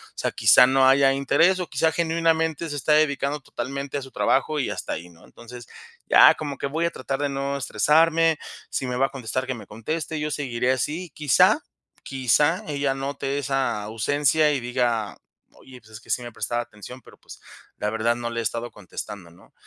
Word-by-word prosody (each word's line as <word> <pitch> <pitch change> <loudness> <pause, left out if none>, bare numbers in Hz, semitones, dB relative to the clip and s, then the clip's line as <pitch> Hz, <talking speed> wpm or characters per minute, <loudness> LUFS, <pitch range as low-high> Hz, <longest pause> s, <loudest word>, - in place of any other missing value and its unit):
sea, - - -2
quizá 125 - +6
no 130 0 +4
haya 135 0 +5
interés, 165 +7 +2
o 180 - -3
quizá 160 +4 +1
genuinamente 165 -1 0
se 145 - -4
está 150 +2 +1
dedicando 150 -1 +1
totalmente 140 +3 -5
a - - -4
su 130 - -12
trabajo 150 +3 +1
y 130 - -1
hasta - - -4
ahí, 85 +3 -7
¿no? 85 0 -19
Entonces, 120 +1 -12 0.4
ya - - +7
como 145 -3 -5
que - - -3
voy 160 +4 -1
a 170 - 0
tratar 135 -3 -4
de 145 0 -1
no 140 0 -3
estresarme, 160 +6 +3 0.3
si - - -3
me 125 - -3
va 135 +2 +2
a - - -16
contestar, 130 -1 -4
que 130 - -1
me 115 - -10
conteste, 155 +8 -4
yo 150 0 -2
seguiré 125 -4 -1
así. 155 +7 -3
Quizá, 150 -5 +4 0.4
quizá 135 +6 +1
ella 140 -2 -1
note 135 0 -3
esa 135 -5 -1
ausencia 145 +8 +1
y 140 - 0
diga: 120 -3 -1 0.4
"Oye, 130 -1 -15
pues 110 - -21
es 110 +1 -11
que - - -21
sí - - 0
me 120 0 -8
prestaba 120 +2 -2
atención, 120 +3 -12
pero, - - -18
pues, - - -14 0.4
la 105 - -2
verdad 110 +2 0
no 120 -1 -4
le 115 0 -3
he - - -4
estado 115 +3 -3
contestando", 100 -2 -9
¿no? 85 - -21
135 Hz, 200 wpm, -24 LUFS, 120-150 Hz, 0.4 s, ya